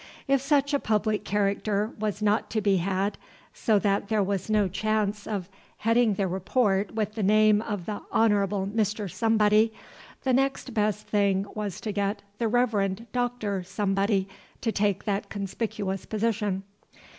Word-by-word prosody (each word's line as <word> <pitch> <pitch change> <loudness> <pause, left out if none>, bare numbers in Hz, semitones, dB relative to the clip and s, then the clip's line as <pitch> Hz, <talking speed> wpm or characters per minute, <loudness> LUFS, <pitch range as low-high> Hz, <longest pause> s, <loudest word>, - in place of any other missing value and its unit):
If 275 -1 +3
such 285 0 +2
a 285 - +3
public 215 -2 0
character 205 +1 0
was 210 0 -2
not 210 +1 +2
to 220 - 0
be 200 -2 +2
had, 195 +3 -1 0.3
so 220 -2 +2
that 200 0 +1
there 215 -1 +2
was 195 0 -2
no 210 -2 +3
chance 210 +1 -1
of 200 -5 -3 0.3
heading 230 -1 +3
the 195 0 0
Report 195 +2 0
with 215 -1 -1
the 220 - -3
name 215 +1 +4
of 205 -6 -4
the 210 -1 -4
Honorable 205 -3 +2
Mr. 210 0 -1
Somebody, 220 0 +3 0.5
the 260 - +2
next 270 -1 0
best 210 -1 0
thing 200 -2 +1
was 210 -3 -4
to 215 - -3
get 200 0 -1 0.2
the 230 - +1
Reverend 220 -3 +1
Dr. 245 -6 -1
Somebody 195 +1 0 0.3
to 225 - 0
take 205 -2 0
that 200 -1 -2
conspicuous 200 -1 -3
position. 210 -3 -1
210 Hz, 155 wpm, -27 LUFS, 200-220 Hz, 0.5 s, name